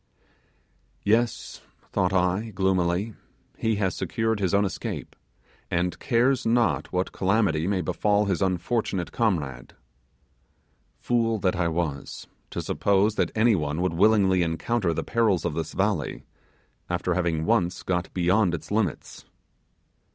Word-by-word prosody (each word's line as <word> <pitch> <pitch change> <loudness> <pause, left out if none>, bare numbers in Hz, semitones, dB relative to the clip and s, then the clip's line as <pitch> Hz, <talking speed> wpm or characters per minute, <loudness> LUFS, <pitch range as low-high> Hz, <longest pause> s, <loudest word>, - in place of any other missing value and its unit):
Yes; 115 +3 0 0.3
thought 90 0 +1
I, 95 +4 +1
gloomily, 95 +1 0 0.4
he 110 -1 0
has 95 -3 0
secured 110 -1 -1
his 95 -3 0
own 100 +1 +3
escape, 95 - -5 0.5
and 90 +1 -1
cares 130 +1 +2
not 115 +1 +1
what 90 +1 -1
calamity 95 -5 +1
may 95 -2 0
befall 100 +5 +1
his 95 -3 -1
unfortunate 95 0 -1
comrade. 75 - -2 1.2
Fool 115 -2 +1
that 95 -1 +1
I 85 -1 +1
was, 80 -4 -3 0.2
to - - -4
suppose 100 +1 +2
that - - 0
any 110 +1 +4
one 75 -3 -1
would 90 -2 0
willingly 95 0 +4
encounter 85 +4 0
the 80 - -2
perils 110 -8 +1
of - - -1
this 80 0 -4
valley, 95 -6 -1 0.6
after 90 0 0
having 85 -3 0
once 95 -6 +1
got 90 -1 -2
beyond 90 +1 +2
its 80 +1 -9
limits! 105 -7 -2
95 Hz, 130 wpm, -25 LUFS, 85-110 Hz, 1.2 s, any